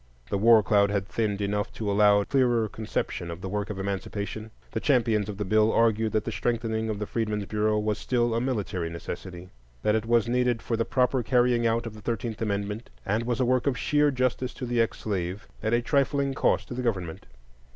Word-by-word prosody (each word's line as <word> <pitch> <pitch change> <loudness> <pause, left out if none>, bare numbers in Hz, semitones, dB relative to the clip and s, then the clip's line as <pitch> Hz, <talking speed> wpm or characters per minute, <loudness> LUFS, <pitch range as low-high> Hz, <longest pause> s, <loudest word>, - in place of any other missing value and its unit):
The - - +1
war 110 0 +6
cloud 100 -1 +3
had 100 -1 -1
thinned 105 -2 -1
enough 105 +1 -1
to 105 -2 -2
allow 100 0 +5
a - - -4
clearer 120 -5 +2
conception 105 -4 -4
of 85 0 -6
the 95 - -4
work 105 +2 -3
of 105 - -4
Emancipation. 100 +2 -4 0.2
The - - -2
champions 110 -6 +2
of 100 - -5
the 105 - -2
bill 110 +3 +3
argued 110 -1 +2
that 110 0 0
the 115 - -2
strengthening 110 -1 -1
of 105 - -2
the 105 - -3
Freedmen's 105 -2 -2
Bureau 105 +1 +1
was 105 0 -1
still 120 -2 +1
a 115 - 0
military 105 -9 -2
necessity; 90 +2 -7 0.3
that 105 - +3
it 110 0 0
was 115 -1 +3
needed 125 -1 +1
for 115 - -1
the 115 0 0
proper 130 0 +1
carrying 120 -1 +2
out 115 +1 0
of 115 - -6
the 110 - -12
Thirteenth 115 0 -3
Amendment, 105 +1 -2 0.2
and 110 +4 0
was 120 0 -1
a 130 - +3
work 130 +2 +1
of 130 -2 +1
sheer 150 0 +2
justice 130 -1 -1
to 125 - -5
the 120 -1 +1
ex 115 - -1
slave, 95 0 -3
at 110 - -1
a 120 0 +2
trifling 140 +1 +1
cost - - +1
to - - -4
the 125 - -3
government. 90 -9 -3
110 Hz, 220 wpm, -27 LUFS, 105-120 Hz, 0.3 s, war